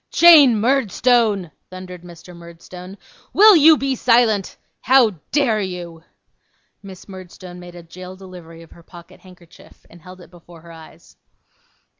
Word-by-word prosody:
'Jane 295 -10 +5
Murdstone,' 230 - -1 0.2
thundered 185 -1 -12
Mr. 175 0 -16
Murdstone. 175 +3 -14 0.4
'Will 420 +1 +6
you 315 0 +5
be 270 0 -3
silent? 230 -5 0 0.2
How 255 -2 +2 0.2
dare 240 -8 -1
you?' 175 -3 -9 0.8
Miss 190 -2 -14
Murdstone 185 -1 -13
made 175 0 -14
a 175 - -13
jail 185 +2 -13
delivery 175 -3 -15
of 165 - -21
her 170 - -18
pocket 170 0 -18
handkerchief, 180 -2 -21
and 170 - -18
held 185 +3 -15
it 175 - -18
before 170 -1 -18
her 170 0 -16
eyes. 160 -1 -18
185 Hz, 140 wpm, -18 LUFS, 175-230 Hz, 0.8 s, Will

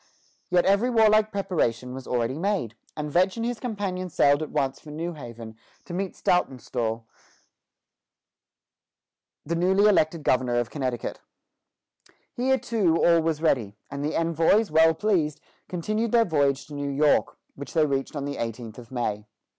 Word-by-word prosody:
Yet 180 -1 +3
every 200 +6 +3
warlike 215 -2 +4
preparation 150 - -1
was 130 0 -8
already 125 +3 -1
made, 185 - -1 0.2
and 150 -1 -4
Vetch 185 +6 +2
and 230 - -2
his 240 -1 -3
companion 195 -6 -3
sailed 145 -2 +3
at 155 - -4
once 135 -1 -1
for 155 - -13
New 165 +3 -4
Haven 115 -6 -9 0.3
to 175 - -8
meet 190 +1 -3
Saltonstall, 120 -8 -1 2.4
the 165 - -2
newly 190 +4 +3
elected 160 -5 +2
governor 125 -2 +1
of 120 -1 -1
Connecticut. 130 -5 -3 1.1
Here 265 +2 +1
too, 205 -10 +1
all 170 -1 +5
was 160 -1 -1
ready, 110 -10 +1
and 140 +1 -4
the 150 - -2
envoys, 165 +6 +2
well 160 +1 +5
pleased, 160 -6 0 0.3
continued 215 +6 -2
their 230 -1 +5
voyage 140 -6 +1
to 150 - -12
New 145 0 -3
York, 145 +2 +2 0.2
which 140 - -9
they 155 -2 +4
reached 135 0 -2
on 140 -1 -3
the 140 0 -4
eighteenth 115 0 -5
of 115 -2 -13
May. 105 -4 -3
155 Hz, 155 wpm, -25 LUFS, 130-190 Hz, 2.4 s, all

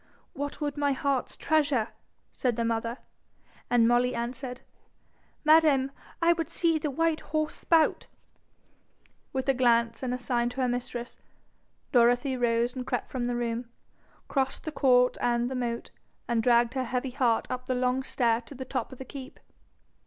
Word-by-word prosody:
'What 285 +1 -4
would 295 -1 -3
my 285 -1 +2
heart's 270 -1 -1
treasure?' 285 -8 +1 0.4
said 245 -3 -1
the 230 0 -1
mother; 230 +1 -1 0.7
and 240 -1 +4
Molly 245 +1 +3
answered, 245 +2 -4 0.8
'Madam, 305 -4 +5 0.3
I 340 +1 +6
would 330 -1 -3
see 330 -2 +2
the 300 - -2
white 325 +3 +1
horse 310 0 -2
spout.' 325 -2 +2 1.2
With 265 0 -2
a 270 - +4
glance 235 -2 +2
and 250 -1 -2
sign 240 -1 0
to 260 +2 -4
her 255 - +2
mistress. 245 -1 -4 0.7
Dorothy 245 +2 +3
rose 240 0 +1
and 255 -1 -5
crept 250 -2 -2
from 245 -2 -2
the 245 - -1
room, 235 0 -2 0.6
crossed 265 -1 -1
the 315 - -4
court 250 -4 +3
and 240 +1 +1
the - - -2
moat, 235 -2 -3 0.4
and 235 -1 +1
dragged 235 0 +3
her 260 -1 -1
heavy 250 +1 -2
heart 245 -3 +1
up 255 0 -4
the 255 - 0
long 250 +1 +1
stair 235 -3 +1
to 260 +4 -12
the 260 0 -6
top 255 +1 -3
of 260 - -10
the 265 - -8
keep. 265 +1 -9
250 Hz, 165 wpm, -28 LUFS, 240-275 Hz, 1.2 s, I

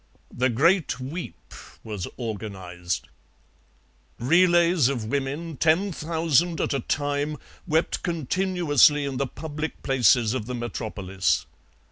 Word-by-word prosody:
The 130 +1 +2
Great 165 - +2
Weep 130 - -7 0.3
was 105 -4 -5
organized. 95 -6 -5 1.1
Relays 170 +1 +4
of 120 -5 -2
women, 140 +5 -3
ten 165 +7 +2
thousand 165 0 +1
at - - 0
a 140 - 0
time, 145 +3 -1 0.3
wept 160 +2 +1
continuously 165 -3 +2
in 135 -2 -3
the 140 - 0
public 155 +3 -6
places 120 -3 +3
of 115 -4 -3
the 125 - -3
Metropolis. 105 -6 -2
140 Hz, 110 wpm, -25 LUFS, 120-165 Hz, 1.1 s, Relays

